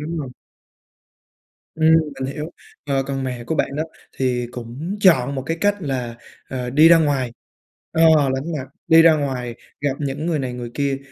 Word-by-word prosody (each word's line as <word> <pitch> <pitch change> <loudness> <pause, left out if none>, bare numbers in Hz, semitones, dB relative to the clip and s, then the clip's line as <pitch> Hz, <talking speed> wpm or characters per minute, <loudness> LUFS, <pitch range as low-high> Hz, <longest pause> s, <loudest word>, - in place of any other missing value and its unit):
đúng 160 +2 -4
hông? 135 -4 -5 1.4
Ừm, 160 0 +4 0.3
mình 135 +1 -3
hiểu. 150 +2 -5 0.4
Ờ, 135 -1 +1
còn 135 0 -3
mẹ 125 -2 -4
của 160 - -2
bạn 140 - -1
đó 155 - 0 0.3
thì 125 -2 0
cũng 125 - -6
chọn 140 -9 +4
một 130 - -3 0.2
cách 205 0 +3
là, 125 -5 -3 0.3
ờ, 125 -2 -4
đi 155 +5 +6
ra 170 0 +7
ngoài 140 -6 0 0.6
ờ, 165 - +2 0.3
lánh 150 +6 -4
mặt, 130 - -5 0.2
đi 160 0 +8
ra 165 -1 +7
ngoài 125 -5 -3 0.3
gặp 145 -1 +1
những 145 +2 -3
người 165 -3 0
này 130 -3 -3
người 120 -1 -6
kia. 140 -1 -1
140 Hz, 180 wpm, -21 LUFS, 125-160 Hz, 1.4 s, đi